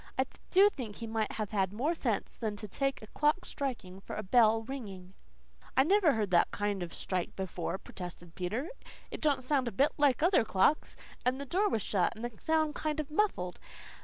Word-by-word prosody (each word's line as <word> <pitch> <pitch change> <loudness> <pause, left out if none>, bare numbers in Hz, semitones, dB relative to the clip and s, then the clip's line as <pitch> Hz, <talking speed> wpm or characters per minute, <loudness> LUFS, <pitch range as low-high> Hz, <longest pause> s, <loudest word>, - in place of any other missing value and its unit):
"I 260 - +3 0.2
do 390 +2 +7
think 230 - -6
he 230 - -6
might 220 -1 -1
have 215 -2 -3
had 190 -3 +1
more 265 +11 0
sense 235 - -1
than 215 -3 -3
to 210 +1 -7
take 275 +4 -1
a - - -9
clock 300 +5 +2
striking 230 -10 -4
for - - -7
a 215 - -3
bell 225 +2 +4
ringing." 200 -8 -7 0.6
"I 265 - +7
never 360 -1 +4
heard 210 -4 -1
that 175 - +5
kind 205 -2 -2
of 175 -1 -4
a - - -8
strike 180 -2 -3
before," 185 -1 -3
protested 175 -3 -9
Peter. 215 - -3 0.4
"It - - -6
don't 285 -4 +2
sound 260 -1 +1
a - - -1
bit 275 +9 +3
like 290 0 +3
other 355 - +5
clocks. 220 +8 +2 0.3
And 255 +2 +1
the 280 - -4
door 390 +9 +2
was 220 - 0
shut 190 0 +1
and 230 +2 -5
the 240 -2 -6
sound 315 -1 +2
kind 310 0 -2
o' 305 - -1
muffled. 300 - 0
230 Hz, 210 wpm, -31 LUFS, 195-290 Hz, 0.6 s, do